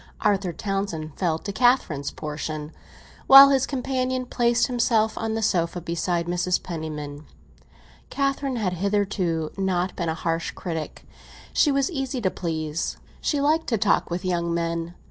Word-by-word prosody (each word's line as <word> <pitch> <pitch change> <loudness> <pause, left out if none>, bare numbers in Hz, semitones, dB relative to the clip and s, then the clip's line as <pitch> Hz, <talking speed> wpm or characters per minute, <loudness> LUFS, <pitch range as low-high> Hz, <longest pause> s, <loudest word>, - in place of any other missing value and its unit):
Arthur 200 -4 +1
Townsend 195 -4 -3
fell 170 -4 0
to 200 - -6
Catherine's 220 - +2
portion, 150 0 -5 0.6
while 275 +1 +11
his 270 -1 +2
companion 255 -1 -1
placed 240 -1 +2
himself 230 -3 +1
on 225 0 -2
the 225 - -2
sofa, 175 -4 +1
beside 170 0 -1
Mrs. 180 +1 0
Penniman. 155 -3 -6 0.8
Catherine 275 -1 -1
had 205 -6 -1
hitherto 185 -4 -1
not 185 -1 0
been 170 -2 -2
a 160 - -1
harsh 165 0 -2
critic; 165 -4 -5 0.5
she 295 - +4
was 275 +3 +1
easy 270 -4 -3
to 190 -5 0
please—she 165 - -3
liked 310 +3 +2
to 230 - +1
talk 205 -1 +2
with 175 +2 -3
young 170 -2 0
men. 170 0 -2
185 Hz, 145 wpm, -24 LUFS, 165-245 Hz, 0.8 s, while